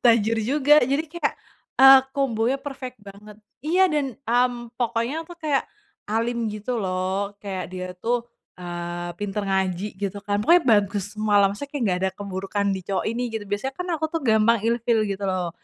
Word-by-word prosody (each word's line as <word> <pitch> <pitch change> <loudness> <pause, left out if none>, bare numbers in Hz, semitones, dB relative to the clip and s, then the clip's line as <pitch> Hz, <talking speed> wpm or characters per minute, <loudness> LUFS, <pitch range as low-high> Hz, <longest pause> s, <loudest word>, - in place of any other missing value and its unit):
tajir 230 -1 +4
juga 290 +6 +4
jadi 275 +5 0
kayak, 335 +2 -2 0.5
eee, 270 0 +11 0.2
kombonya 255 -1 +1
perfect 265 -3 -7
banget. 205 +1 -12 0.3
Iya 350 +5 +3
dan, 275 -4 -1
mmm, 240 0 0
pokoknya 245 +6 -1
itu 350 - -10
kayak, 300 -4 0 0.4
alim 230 +2 -1
gitu 215 +3 -3
loh 190 +1 -2
kayak 190 -2 -4
dia 185 0 -4
tuh, 240 +4 0 0.4
eee, 175 0 -5
pinter 205 0 -3
ngaji 190 0 0
gitu 200 0 -3
kan, 205 0 -1
pokoknya 335 +11 +5
bagus 205 -4 +2
semualah 205 -2 +3
maksudnya 205 +8 -6
kayak 290 -3 -2
nggak 180 -1 +1
ada - - 0
keburukan 200 +1 -3
di 190 - -4
cowok 195 -2 -1
ini 235 +2 -2
gitu, 220 -2 -3
biasanya 265 +7 -2
kan 360 +4 -5
aku 315 -1 -2
tuh 330 - -1
gampang 225 -1 +4
ilfil 230 -1 +1
gitu 200 -1 -3
loh, 185 -2 -1
220 Hz, 175 wpm, -24 LUFS, 200-255 Hz, 0.5 s, eee